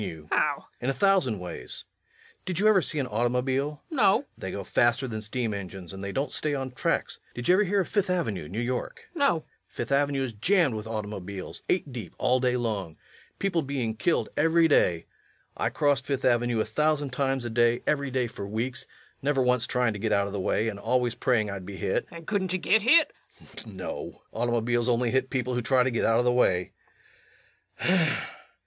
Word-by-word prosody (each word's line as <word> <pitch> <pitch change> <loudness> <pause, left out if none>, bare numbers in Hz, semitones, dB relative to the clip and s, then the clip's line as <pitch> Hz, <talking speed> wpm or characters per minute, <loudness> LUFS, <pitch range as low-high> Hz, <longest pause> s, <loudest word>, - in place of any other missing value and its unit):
LUKE. 80 -6 -6
How? - - +3
REVENUE. - - -17 0.2
In 125 - 0
a - - +1
thousand 180 - +2
ways.... 90 -1 -5 0.6
Did 180 -3 -2
you 205 +3 +3
ever 210 -3 +6
see 155 - -2
an 140 - 0
automobile? 125 +5 -1
LUKE. - - -4
No. 205 -4 +6
REVENUE. - - -22
They 95 - -6
go 100 +1 -4
faster 120 +6 +2
than 110 -3 -4
steam 110 +1 -2
engines, 95 -3 -7
and 95 0 -7
they 100 - -3
don't 135 +5 -2
stay 150 -1 0
on 135 -1 -3
tracks. 125 - -1 0.2
Did 120 - -4
you 180 - +6
ever 200 +3 +4
hear 200 0 +2
of 180 - -3
Fifth 205 -3 0
Avenue, 130 - -1
New 100 +5 -4
York? 125 - -3
LUKE. 340 - -7
No. 285 - +5
REVENUE. 160 - -5 0.2
Fifth - - -6
Avenue 140 0 +2
is 125 -3 -4
jammed 160 - +2
with 110 0 -5
automobiles, 100 -3 -6
eight 150 -7 0
deep 110 -8 -7
all 130 +1 +2
day 125 -1 +1
long. 105 -9 -3 0.4
People 185 -4 0
being 135 -6 -2
killed 170 +9 +1
every 165 +2 +4
day. 85 - +3 0.5
I - - 0
crossed 140 -2 +1
Fifth 140 -2 -1
Avenue 120 -2 +2
a - - +1
thousand 145 +4 0
times 135 -1 -1
a 120 - -3
day, 120 +1 +2
every 140 -2 0
day 130 -1 0
for 100 -3 -6
weeks, 120 +5 -3 0.3
never 140 -1 +2
once 125 -1 +2
trying 125 -3 +1
to 100 - -6
get 110 +1 -1
out 100 -1 +3
of 100 - -6
the 100 - -2
way, 105 +4 +1
and 100 -3 -4
always 120 +2 +1
praying 110 -6 +1
I'd 100 -1 -6
be 95 +1 -8
hit. - - -1
LUKE. 170 - -9
And 165 - -12
couldn't 190 -2 -1
yu - - +2
git 220 +4 +3
hit? 305 +9 +5 0.3
REVENUE. - - -25
[In - - -16
disgust.] - - -9
No. 95 -3 -7
Automobiles 120 +1 0
only 120 0 +2
hit 130 0 +1
people 125 -1 -1
who 125 - 0
try 125 +2 +3
to 130 - 0
get 115 - 0
out 115 - +4
of 120 - +2
the 125 - +3
way. 90 -7 +2
125 Hz, 220 wpm, -27 LUFS, 110-145 Hz, 0.6 s, ever